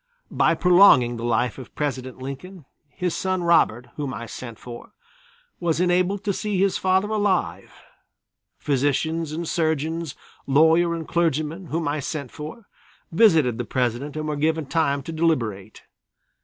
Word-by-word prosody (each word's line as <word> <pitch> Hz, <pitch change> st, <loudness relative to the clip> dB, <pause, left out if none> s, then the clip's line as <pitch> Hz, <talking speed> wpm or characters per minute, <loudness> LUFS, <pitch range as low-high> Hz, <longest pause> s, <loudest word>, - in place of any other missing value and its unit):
By -, -, +2 dB
prolonging 175 Hz, -10 st, +5 dB
the 115 Hz, -, -6 dB
life 120 Hz, +1 st, 0 dB
of 130 Hz, -, -12 dB
President 130 Hz, -3 st, -3 dB
Lincoln, 140 Hz, +6 st, -8 dB, 0.2 s
his 180 Hz, +2 st, -3 dB
son 185 Hz, -1 st, -1 dB
Robert, 160 Hz, -9 st, +3 dB
whom 145 Hz, -3 st, -3 dB
I 115 Hz, -, -6 dB
sent 115 Hz, -1 st, -8 dB
for, 120 Hz, -1 st, -11 dB, 0.7 s
was 165 Hz, -2 st, 0 dB
enabled 180 Hz, +3 st, +1 dB
to 205 Hz, -2 st, 0 dB
see 210 Hz, 0 st, -2 dB
his 195 Hz, 0 st, +2 dB
father 190 Hz, +2 st, +2 dB
alive. 205 Hz, -4 st, -1 dB, 0.9 s
Physicians 150 Hz, +3 st, 0 dB
and 165 Hz, +2 st, -4 dB
surgeons, 160 Hz, -1 st, -1 dB, 0.3 s
lawyer 160 Hz, +4 st, +4 dB
and 165 Hz, -2 st, -6 dB
clergyman, 165 Hz, +1 st, -1 dB
whom 160 Hz, 0 st, -2 dB
I 145 Hz, +1 st, -1 dB
sent 140 Hz, -2 st, -5 dB
for, 155 Hz, +9 st, -9 dB, 0.5 s
visited 160 Hz, -, +4 dB
the -, -, -1 dB
President 125 Hz, +4 st, -2 dB
and 155 Hz, 0 st, -3 dB
were 150 Hz, -, -2 dB
given 160 Hz, +1 st, 0 dB
time 140 Hz, -2 st, 0 dB
to 165 Hz, -, -6 dB
deliberate. 115 Hz, -, -1 dB
155 Hz, 145 wpm, -23 LUFS, 130-175 Hz, 0.9 s, prolonging